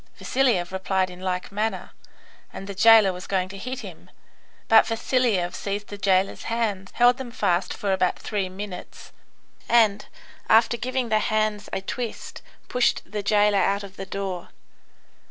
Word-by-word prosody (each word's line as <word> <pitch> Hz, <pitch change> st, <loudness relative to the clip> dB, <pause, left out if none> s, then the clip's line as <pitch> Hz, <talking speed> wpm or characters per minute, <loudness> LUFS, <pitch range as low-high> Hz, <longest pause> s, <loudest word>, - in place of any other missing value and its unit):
Vasiliev 245 Hz, -10 st, +1 dB
replied 190 Hz, 0 st, -1 dB
in 180 Hz, -, -12 dB
like 185 Hz, 0 st, -3 dB
manner, 215 Hz, +2 st, -3 dB, 0.6 s
and 195 Hz, -, -8 dB
the 200 Hz, -, -6 dB
jailer 215 Hz, -1 st, +6 dB
was 180 Hz, +1 st, -9 dB
going 185 Hz, -2 st, 0 dB
to 195 Hz, -, -9 dB
hit 255 Hz, +5 st, -5 dB
him, -, -, -11 dB, 0.6 s
but 225 Hz, 0 st, +6 dB
Vasiliev 225 Hz, -6 st, 0 dB
seized 205 Hz, +1 st, -4 dB
the 205 Hz, -, -7 dB
jailer's 190 Hz, -1 st, +1 dB
hands, 210 Hz, -5 st, -2 dB
held 245 Hz, +1 st, +5 dB
them 260 Hz, -2 st, -6 dB
fast 190 Hz, -6 st, 0 dB
for 200 Hz, -2 st, -1 dB
about 185 Hz, -1 st, +1 dB
three 200 Hz, -3 st, -3 dB
minutes, 190 Hz, -1 st, -9 dB, 0.6 s
and, 215 Hz, -4 st, +3 dB, 0.4 s
after 225 Hz, +2 st, +5 dB
giving 255 Hz, 0 st, -2 dB
the 215 Hz, 0 st, +3 dB
hands 215 Hz, -1 st, -1 dB
a -, -, -2 dB
twist, 235 Hz, +3 st, -6 dB, 0.3 s
pushed 250 Hz, -1 st, +1 dB
the 210 Hz, +2 st, -5 dB
jailer 205 Hz, 0 st, +3 dB
out 200 Hz, +1 st, +1 dB
of 195 Hz, -1 st, -11 dB
the 195 Hz, -, -7 dB
door. 190 Hz, -2 st, -4 dB
205 Hz, 155 wpm, -24 LUFS, 190-225 Hz, 0.6 s, jailer